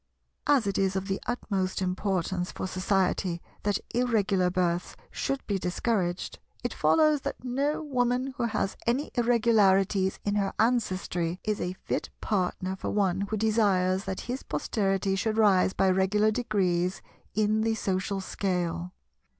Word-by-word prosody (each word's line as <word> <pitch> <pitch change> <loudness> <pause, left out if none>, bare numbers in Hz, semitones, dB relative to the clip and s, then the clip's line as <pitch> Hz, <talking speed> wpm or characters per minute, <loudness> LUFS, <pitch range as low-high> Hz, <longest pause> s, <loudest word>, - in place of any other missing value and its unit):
As 280 -6 +4
it 200 -1 0
is 195 0 +1
of 190 0 -2
the 195 -1 -1
utmost 195 -6 -1
importance 185 -1 -1
for - - -5
Society 185 -1 0 0.2
that 205 -1 +1 0.2
Irregular 210 -7 +2
births 175 -1 -1 0.2
should 275 0 -2
be 200 -2 -1
discouraged, 180 0 -1 0.2
it - - -2
follows 305 -3 +3
that - - -5
no 275 +5 -1
Woman 255 -1 0
who 250 -4 -1
has 215 -4 -1
any 255 +5 0
Irregularities 210 -5 +3
in 205 - +1
her 195 -1 0
ancestry 185 -7 0
is 210 -1 -1
a 180 - -2
fit - - -2
partner 185 -1 -1
for - - -4
one 195 -2 +1
who 215 - -1
desires 200 -4 +2
that 190 -1 -3
his 250 +2 -4
posterity 195 -2 0
should 215 +3 -1
rise 195 -4 +4
by 190 - +2
regular 200 +3 +3
degrees 190 -6 0 0.3
in 215 +1 +2
the 225 0 +1
social 195 -1 -1
scale. 180 -2 -2
195 Hz, 145 wpm, -28 LUFS, 185-225 Hz, 0.3 s, As